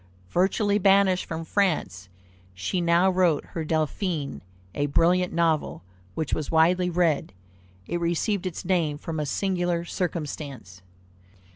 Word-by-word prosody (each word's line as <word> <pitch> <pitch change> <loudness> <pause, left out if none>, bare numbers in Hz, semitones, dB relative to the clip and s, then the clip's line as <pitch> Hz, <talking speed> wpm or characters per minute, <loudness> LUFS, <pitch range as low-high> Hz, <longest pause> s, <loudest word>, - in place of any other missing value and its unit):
Virtually 200 +3 +2
banished 195 -1 +3
from 160 0 -5
France, 150 - -1 0.5
she 95 - -2
now 170 +2 +3
wrote 180 -5 +2
her 165 - -4
Delphine, 155 0 -2 0.3
a 145 - -1
brilliant 180 +5 +2
novel 165 - 0 0.3
which 160 -3 -2
was 155 - -2
widely 180 +3 +3
read. 170 - +1 0.5
It 175 - -2
received 175 +3 0
its 180 - -6
name 170 -5 +1
from 160 +1 -5
a 150 - -2
singular 175 -1 -1
circumstance. 145 - -5
170 Hz, 125 wpm, -25 LUFS, 155-180 Hz, 0.5 s, banished